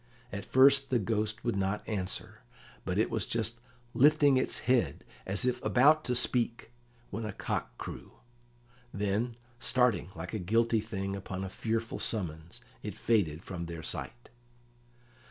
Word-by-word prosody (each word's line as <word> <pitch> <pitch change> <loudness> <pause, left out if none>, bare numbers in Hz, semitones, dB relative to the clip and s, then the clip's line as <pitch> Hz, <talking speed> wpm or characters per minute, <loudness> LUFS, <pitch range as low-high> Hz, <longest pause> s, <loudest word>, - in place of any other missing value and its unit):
At 100 0 -5
first 135 +1 +5
the 130 - +3
Ghost 110 0 -1
would 120 -3 0
not 100 +2 -1
answer, 95 -4 -4 0.4
but - - -1
it - - +2
was - - 0
just 115 0 -1 0.3
lifting 145 0 +5
its 130 - +1
head 125 -1 +1 0.2
as 100 +6 +1
if 125 0 0
about 150 +5 +5
to 125 - 0
speak, 120 -1 +2 0.4
when 115 +3 -4
a 105 - -3
cock - - -4
crew; - - -8 0.8
then, 105 +4 -1 0.2
starting 125 -8 +2
like 85 +2 -7
a 110 - -1
guilty 115 +4 +2
thing 100 -3 -4
upon 95 -1 -5
a 95 - -4
fearful 115 +3 -2
summons, 85 -6 -3 0.2
it - - -6
faded 90 -8 +1
from 85 -3 -5
their 85 -1 -7
sight. 120 +8 -6
110 Hz, 150 wpm, -31 LUFS, 95-125 Hz, 0.8 s, first